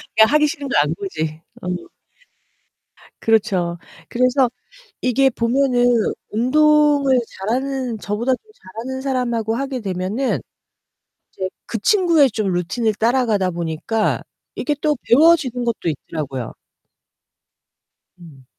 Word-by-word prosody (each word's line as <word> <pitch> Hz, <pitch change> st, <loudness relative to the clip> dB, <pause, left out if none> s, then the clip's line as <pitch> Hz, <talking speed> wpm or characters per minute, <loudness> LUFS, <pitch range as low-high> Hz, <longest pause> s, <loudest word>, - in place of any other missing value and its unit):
그냥 220 Hz, 0 st, +6 dB
하기 300 Hz, 0 st, +5 dB
싫은 285 Hz, -2 st, -5 dB
거 -, -, +1 dB
안 150 Hz, +2 st, 0 dB
보지. 160 Hz, -5 st, -4 dB, 0.2 s
어. 180 Hz, -, -4 dB, 1.3 s
그렇죠. 190 Hz, -6 st, +1 dB, 0.3 s
그래서 255 Hz, +1 st, +2 dB, 0.5 s
이게 265 Hz, +2 st, +3 dB
보면은 245 Hz, +1 st, +2 dB, 0.4 s
운동을 285 Hz, +2 st, +3 dB, 0.2 s
잘하는 250 Hz, +2 st, -2 dB
저보다 215 Hz, +6 st, -1 dB
더 -, -, -7 dB, 0.4 s
잘하는 260 Hz, +1 st, -5 dB
사람하고 240 Hz, -4 st, -1 dB
하게 270 Hz, -1 st, -3 dB
되면은 195 Hz, +6 st, -2 dB, 0.9 s
이제 190 Hz, -1 st, -3 dB, 0.2 s
그 230 Hz, -, -3 dB
친구의 335 Hz, -, +4 dB
좀 205 Hz, -3 st, -1 dB
루틴을 210 Hz, +6 st, 0 dB
따라가다 220 Hz, -5 st, +1 dB
보니까 170 Hz, +6 st, -1 dB, 0.3 s
이게 295 Hz, -, -1 dB
또 300 Hz, -1 st, +2 dB
배워지는 270 Hz, -3 st, +4 dB
것도 230 Hz, -7 st, -2 dB
있더라고요. 140 Hz, -4 st, -5 dB, 1.6 s
음. 150 Hz, -7 st, -15 dB
235 Hz, 245 characters per minute, -20 LUFS, 190-270 Hz, 1.6 s, 그냥